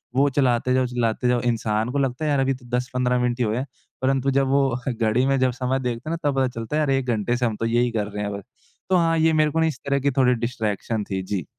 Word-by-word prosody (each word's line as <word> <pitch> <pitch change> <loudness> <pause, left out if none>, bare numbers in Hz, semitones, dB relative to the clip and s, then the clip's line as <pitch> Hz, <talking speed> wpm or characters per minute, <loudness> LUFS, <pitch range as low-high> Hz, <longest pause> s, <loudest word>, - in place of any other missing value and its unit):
वो 140 +2 +4
चलाते 125 -2 +2
जाओ 130 0 +2
चलाते 120 -1 -1
जाओ 125 -1 +2
इंसान 115 -2 0
को 140 - -2
लगता 135 +2 -1
है - - +1
यार 140 - +2
अभी 135 0 +2
तो 125 -1 -12
10-15 125 0 0
मिनट 125 0 0
ही - - +2
हुए 110 +1 -1
हैं, 130 - -2 0.4
परंतु 135 +1 +1
जब 135 0 +2
वो 140 0 +3 0.2
घड़ी 115 +1 +1
में 135 0 +2
जब 130 0 +2
समय 125 +2 -1
देखते 125 +3 -4
हैं 165 - -1
ना 145 - +2
तब 140 - -2
पता 130 - +3
चलता 115 +6 -4
है - - +2
यार 150 - 0
1 135 -1 +1
घंटे 120 +3 -1
से 125 - 0
हम 115 -2 -1
तो 115 - -1
यही 120 +1 +1
कर 105 -3 -1
रहे 105 0 -5
हैं 100 - -3
बस। 100 - -10 0.5
तो 190 - +3
हाँ, 165 -1 +2
ये 160 0 +3
मेरे 155 -1 +3
को 160 - 0
ना 160 - +3
इस 150 -5 -4
तरह 140 0 +1
की 140 +1 +1
थोड़ी 130 -1 +3
डिस्ट्रैक्शन 115 -2 -2
थी। 95 0 -1
जी। 95 -4 -3
125 Hz, 285 wpm, -23 LUFS, 115-135 Hz, 0.5 s, वो